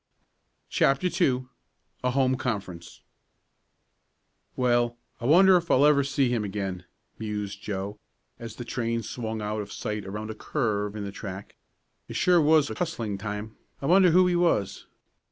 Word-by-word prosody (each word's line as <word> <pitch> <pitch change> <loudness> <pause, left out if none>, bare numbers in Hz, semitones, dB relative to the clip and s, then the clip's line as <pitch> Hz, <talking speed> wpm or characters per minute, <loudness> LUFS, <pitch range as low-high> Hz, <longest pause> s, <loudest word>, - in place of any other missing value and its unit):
CHAPTER 140 +7 +2
II 130 -4 +1 0.6
A 125 - +2
HOME 130 0 +2
CONFERENCE 100 -9 -5 1.5
"Well, 120 -1 +1 0.2
I 120 - -6
wonder 185 +5 +7
if 170 -1 -4
I'll 135 +3 +5
ever 145 -1 +5
see 135 -1 +1
him 120 -3 0
again," 95 -3 -4 0.3
mused 105 -2 -4
Joe, 100 +1 -5 0.4
as 115 -2 -8
the 120 - -7
train 115 -2 -2
swung 110 -2 -4
out 105 +1 -2
of 100 0 -8
sight 105 -2 -4
around 105 +3 -5
a - - -5
curve 105 -4 -2
in 105 - -4
the 100 - -5
track. 100 0 -8 0.5
"It - - -8
sure 180 -2 +4
was 150 -1 +4
a - - -2
hustling 115 - -3
time. 105 +1 -5 0.2
I - - -6
wonder 185 +3 +6
who 180 +2 +5
he 180 -1 +2
was? 165 - 0
115 Hz, 155 wpm, -26 LUFS, 105-140 Hz, 1.5 s, wonder